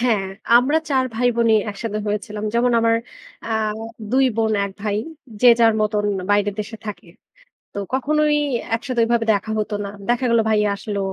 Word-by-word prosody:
হ্যাঁ, 225 -5 +1 0.3
আমরা 290 +6 +2
৪ 260 -2 +2
ভাইবোনই 235 -2 +2
একসাথে 210 +1 -4
হয়েছিলাম। 210 0 -3
যেমন 240 +1 +2
আমার 230 0 +3 0.5
আ 230 - -2 0.6
২ 265 +1 +4
বোন, 220 -1 +1
১ 200 - -5
ভাই। 210 -1 -1 0.4
যে 250 - +7
যার 225 -1 +6
মতন 210 -1 0 0.3
বাইরের 205 0 +2
দেশে 215 +2 -7
থাকে। 205 -4 -7 0.7
তো - - -8 0.2
কখনোই 300 +3 +2 0.4
একসাথে 240 0 -2
ঐভাবে 230 -1 +1
দেখা 210 +2 -2
হতো 215 0 -3
না। - - -5 0.2
দেখা 245 +1 +1
গেল 235 - +4
ভাইয়া 210 -1 +2
আসলো। 205 0 -4
225 Hz, 160 wpm, -21 LUFS, 210-245 Hz, 0.7 s, যে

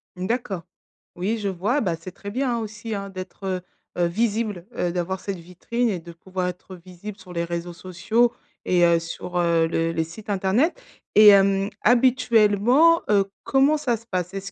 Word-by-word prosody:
Mmh, 185 +1 -4
d'accord. 210 -8 -2 0.5
Oui, 200 +6 -1
je 205 -2 -3
vois, 205 +10 0
bah, 175 -6 0
c'est 185 +2 -9
très 200 +2 -8
bien, 250 0 0
hein, - - -2
aussi, 215 0 -5
hein 200 0 -5
d'être, 185 +1 -8
heu, 185 -1 -2 0.4
heu, 175 - +2
visible, 210 -1 -1
heu, 175 - 0
d'avoir 180 +1 -2
cette 195 -2 -5
vitrine 185 +8 -2
et 185 -4 -2
de 170 +1 -11
pouvoir 185 +2 -4
être 180 +1 -7
visible 185 +3 -10
sur 185 -2 -12
les 170 0 -1
réseaux 170 0 -4
sociaux 220 +8 0 0.3
et 175 -1 +3
heu, 170 -1 +4
sur, 175 +2 -6
heu, 170 -1 +3
le 165 0 0
les 160 -1 0
sites 205 +6 -11
internet. 215 - +1 0.3
Et 215 0 +8
hem, 195 0 +4
habituellement, 245 +4 +4
heu, 200 -2 +4 0.2
comment 280 +3 +3
ça 245 -6 0
se 230 - -19
passe? 180 0 -2
Est-ce 195 0 -6
195 Hz, 190 wpm, -23 LUFS, 175-225 Hz, 0.5 s, Et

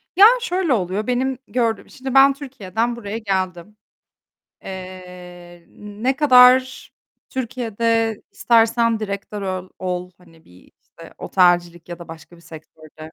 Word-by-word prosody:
Ya 390 +3 +8 0.2
şöyle 365 - 0
oluyor, 195 0 -2
benim 255 +1 -1
gördüğüm, 230 -3 -2
şimdi 265 0 -7
ben 275 +1 +6
Türkiye'den 240 -5 -4
buraya 215 -2 -6
geldim. 190 -2 -4 0.9
Eee, 180 -2 -11
ne 210 +6 -4
kadar 255 -2 +5 0.4
Türkiye'de 230 -3 -1 0.2
istersen 230 -1 +2
direktör 200 0 -5
ol 185 -1 -4
ol 180 -1 -4
hani 165 -3 -22
bir 90 +1 -21
işte, - - -16
otelcilik 175 -2 +1
ya 175 -1 -7
da 170 - -12
başka 165 +1 -12
bir - - -19
sektörde. 155 -1 -14
205 Hz, 125 wpm, -20 LUFS, 180-245 Hz, 0.9 s, Ya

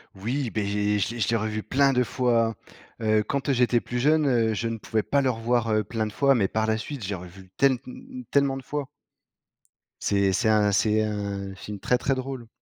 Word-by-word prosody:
Oui, 120 +6 -2
beh, 105 -2 -1
je 100 +1 -2 0.4
l'ai 120 - -7
je 100 - +1
l'ai 115 - +2
revu 110 -1 -2
plein 140 0 +3
de 125 0 +3
fois, 115 -3 +1 0.5
heu, 110 -1 +2
quand, 140 +5 -2
heu, - - +4
j'étais 120 -1 +3
plus 125 0 -4
jeune. 155 +3 +3
Heu, 115 -3 +2
je 115 +3 -2
ne 115 0 -3
pouvais 110 0 -1
pas 140 0 +1
le 130 - +2
revoir, 115 -1 0
heu, 110 0 +2
plein 110 +1 -2
de 105 - -8
fois, 140 -1 +4
mais 100 -5 +2
par 110 +2 -1
la 110 0 +1
suite, 130 0 -6
j'ai 100 0 -2
revu 90 +1 -11
tel 135 -1 +5
mmh 125 - -5
mmh 255 - -9
tellement 140 -1 +2
de 135 - -8
fois. 145 -1 -4 1.1
C'est 100 -1 +2
c'est 110 +4 +1
un 105 -1 +4
c'est 110 +2 +2
un 100 -2 -4
film 100 +1 -8
très 125 - +2
très 135 - 0
drôle. 130 -2 -5
115 Hz, 230 wpm, -25 LUFS, 105-130 Hz, 1.1 s, tel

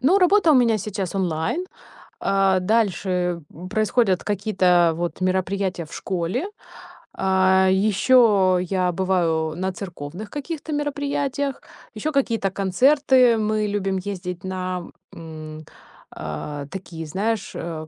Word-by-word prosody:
Ну, 330 +11 +4
работа 365 -2 +5
у - - +5
меня 230 -4 +4
сейчас 195 -2 -4
онлайн. 180 - -1 0.5
А, 195 -1 +2
дальше, 180 -4 0
м, 180 +4 -9
происходят 215 -2 +1
какие-то 185 -5 +2
вот 175 +2 -4
мероприятия 185 -1 -1
в 155 - -14
школе. 185 - -2 0.7
А, 190 0 +3
еще 200 -1 +4
я 185 0 0
бываю 165 -4 0
на 185 +2 -2
церковных 180 +1 -8
каких-то 305 +1 -6
мероприятиях, 285 -1 -2 0.3
еще 310 - -2
какие-то 230 -8 0
концерты. 250 +5 +4
Мы 215 0 0
любим 195 -2 -1
ездить 180 -2 -5
на, 185 -1 -3 0.3
м, 155 -1 -9 0.5
а, 140 - -6
такие, 165 -1 -7
знаешь, 205 +8 -2
а, 160 -2 -5
190 Hz, 120 wpm, -23 LUFS, 175-225 Hz, 0.7 s, работа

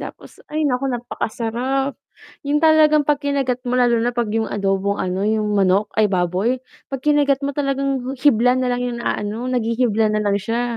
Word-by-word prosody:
tapos - - -10
ay 310 0 -1
nako, 270 0 0
napakasarap 245 +3 -2 0.5
yung 290 +1 +1
talagang 310 -1 +5
pagkinagat 280 -3 0
mo 245 - -3
lalo 245 -2 +3
na 240 +2 0
pag 235 -2 -1
yung 225 0 0
adobong, 195 0 -1
ano, 185 +2 -2
yung 210 -1 0
manok, 195 +2 +2
ay, 215 -1 +4
baboy 185 +8 0 0.3
pag 270 - -3
kinagat 290 -2 +2
mo 280 0 -2
talagang 275 -2 -1
hibla 250 -4 +4
nalang 250 -1 -1
yung 245 -1 -3
inaano 220 +2 -3
naghihibla 230 -3 +1
nalang 210 -1 +1
siya. 230 +4 -2
245 Hz, 160 wpm, -20 LUFS, 215-275 Hz, 0.5 s, talagang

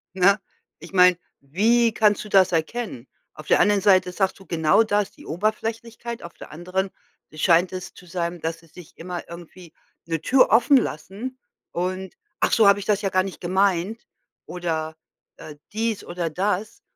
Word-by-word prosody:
Ne? 195 +3 +4 0.4
Ich 170 +4 -12
meine, 180 -1 +6 0.2
wie 220 +10 +2
kannst 210 -2 +2
du 210 - -11
das 190 -2 +5
erkennen? 165 - -3 0.3
Auf 155 - -12
der - - +4
anderen 205 -1 +3
Seite 185 -2 +4
sagst 190 +1 -1
du 195 - -15
genau 160 +5 +3
das, 205 -2 0
die - - -16
Oberflächlichkeit, 225 +5 -3
auf 170 - -9
der - - -12
anderen 185 +4 -3 0.4
scheint 170 +3 +3
es 185 -1 -7
zu 180 - -15
sein, 170 0 -3
dass 165 0 -3
sie 165 - -21
sich 170 +1 -15
immer 175 +1 -6
irgendwie 170 0 -12 0.3
'ne 165 -2 -2
Tür 260 +9 +4
offen 245 +5 +5
lassen 230 +5 -4 0.3
und: 185 +2 -4 0.2
„Ach - - +1
so 220 -3 +5
habe 200 0 +5
ich 200 - -7
das 205 -1 +1
ja 195 - 0
gar 185 0 +2
nicht 190 -1 -7
gemeint 190 +3 0 0.4
oder, 160 -3 -3 0.4
äh, 150 - -10 0.2
dies 225 -1 -1
oder 175 -1 -3
das.“ 195 +5 -2
185 Hz, 175 wpm, -23 LUFS, 170-210 Hz, 0.4 s, meine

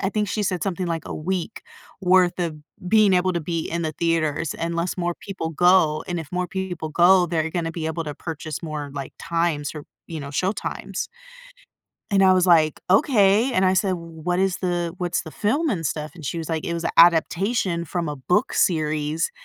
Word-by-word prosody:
I 195 - 0
think 210 -2 0
she 210 +1 -1
said 185 -4 -1
something, 185 -2 -2
like, 165 -2 -3
a - - -5
week 180 +5 -3 0.4
worth 185 -1 +3
of 170 -3 -2 0.3
being 210 0 +5
able 185 +1 +2
to 170 - -1
be 165 +1 -3
in 170 +1 -2
the 155 -1 -2
theaters, 165 -2 0
unless 170 +2 -2
more 175 -1 -1
people 190 -5 -5
go, 165 -2 +3
and 175 -1 -3
if 150 - -10
more 180 0 -1
people 180 -3 -4
go, 175 +3 +5
they're 165 -1 -1
gonna 165 -1 -2
be 160 -1 -4
able 160 +1 -3
to 150 -1 -5
purchase 155 -1 -6
more, 150 -3 -5
like, 140 -2 -6
times, 165 -4 -1
or, 150 -2 -7 0.2
you 160 -2 -6
know, 140 - -7
showtimes 185 +8 -3 1.1
and 195 -1 +4
I 190 -1 +6
was 185 -1 +3
like, 160 -4 +4
"Okay," 215 - +4
and 190 - +2
I 185 - +4
said, 190 +1 +1
"W 170 -2 -5
what 180 +1 0
is 190 -1 +1
the 175 -2 -2
what's 175 -1 -1
the 160 - -10
film 285 +10 0
and 170 - -2
stuff?" 150 +1 -3
And 165 -4 -10
she 170 - -3
was 165 -1 -5
like, 160 -1 -2
it 170 - -2
was 170 0 -3
a - - -1
adaptation 170 +2 +3
from 170 0 -3
a 145 - -5
book 135 +7 +1
series 155 -1 0
170 Hz, 210 wpm, -23 LUFS, 160-185 Hz, 1.1 s, I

